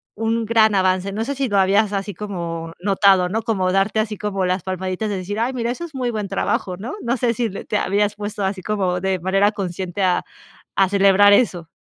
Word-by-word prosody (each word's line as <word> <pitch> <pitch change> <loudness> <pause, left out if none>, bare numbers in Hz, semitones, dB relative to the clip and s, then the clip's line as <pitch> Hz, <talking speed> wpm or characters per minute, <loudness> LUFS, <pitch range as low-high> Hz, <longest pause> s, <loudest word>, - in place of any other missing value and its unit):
un 225 +1 -1
gran 220 -1 +4
avance. 185 0 +1
No 220 +3 -3
sé 280 - -2
si 270 -2 -1
lo 205 - +1
habías 200 +2 +3
así 200 0 -3
como 170 -4 -5
notado, 195 -1 +3
¿no?, 220 +4 -1
como 200 -5 0
darte 195 +3 +1
así 215 0 -1
como 195 -2 -2
las 180 +1 0
palmaditas 185 +2 -3
de 200 - -2
decir: 200 +3 -4
"Ay, 240 +3 0
mira, 235 -2 -1
eso 340 +8 -5
es 315 -4 -12
muy 250 -2 -1
buen 210 -3 -3
trabajo", 190 -1 -2
¿no? 220 +7 -6
No 240 +2 -1
sé, 235 0 +1
si 235 0 -1
te 210 +2 -3
habías 205 +1 +1
puesto 205 -1 -5
así 190 0 -2
como 185 -3 -1
de 190 0 0
manera 195 +3 +2
consciente 190 -1 -4
a 180 -1 +2 0.5
a 195 -1 +4
celebrar 200 +1 +5
eso. 180 -8 +1
200 Hz, 220 wpm, -21 LUFS, 185-220 Hz, 0.5 s, celebrar